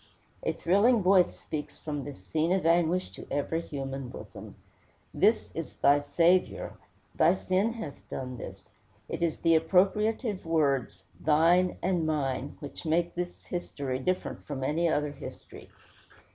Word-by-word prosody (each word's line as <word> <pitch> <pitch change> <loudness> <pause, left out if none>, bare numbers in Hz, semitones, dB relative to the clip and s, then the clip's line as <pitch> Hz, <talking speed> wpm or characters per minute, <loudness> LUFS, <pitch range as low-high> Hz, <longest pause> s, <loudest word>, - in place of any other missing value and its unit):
A - - 0
thrilling 205 +5 +3
voice 185 -1 +4
speaks 150 -1 -6
from 145 -3 -4
this 135 -10 -9
scene 160 - 0
of 190 -2 +1
anguish 170 +2 +2
to - - -11
every 165 +3 -1
human 135 -4 -5
bosom: - - -10 0.6
This - - +2
is - - -6
thy 140 +1 +4
Saviour. 170 +5 +2 0.4
Thy 170 +3 +4
sin 190 +5 0
hath 165 -12 -7
done 130 -1 -5
this. 95 0 -9 0.4
It - - -5
is 170 -2 +1
the 165 -1 +3
appropriative 200 +5 +1
words, 140 - 0 0.2
thine 170 +4 +3
and 175 -3 +1
mine, 140 -3 -2
which 145 - -8
make 170 +1 +1
this 175 0 -5
history 140 -7 -4
different 185 +7 -2
from 135 -3 -4
any 165 +5 +1
other 150 -1 0
history. 145 - -10
160 Hz, 145 wpm, -29 LUFS, 145-180 Hz, 0.6 s, voice